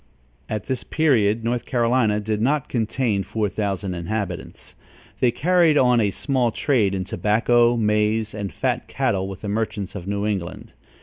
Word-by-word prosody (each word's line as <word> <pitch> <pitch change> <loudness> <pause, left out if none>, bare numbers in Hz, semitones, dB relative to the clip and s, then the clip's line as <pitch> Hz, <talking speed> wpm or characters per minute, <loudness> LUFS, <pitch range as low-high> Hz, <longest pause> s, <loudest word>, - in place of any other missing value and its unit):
At 105 -2 -3
this 130 - -3
period, 115 -8 +2
North 120 +1 -1
Carolinia 120 -3 +2
did 105 0 -2
not 140 +4 +1
contain 115 -2 0
four 105 +1 -2
thousand 100 -2 -2
inhabitants. 90 +1 -5 0.5
They 125 - +4
carried 165 +4 +3
on 125 -3 +4
a 105 - +2
small 125 +3 0
trade 110 -7 +1
in 95 - -2
tobacco, 120 +5 +2
maize 105 0 +1
and 100 -2 -4
fat - - -2
cattle 95 0 -1
with 95 -1 -8
the 105 - -5
merchants 105 -2 -2
of 95 -3 -7
New 100 +1 -1
England. 95 -8 -4
110 Hz, 160 wpm, -22 LUFS, 100-120 Hz, 0.5 s, They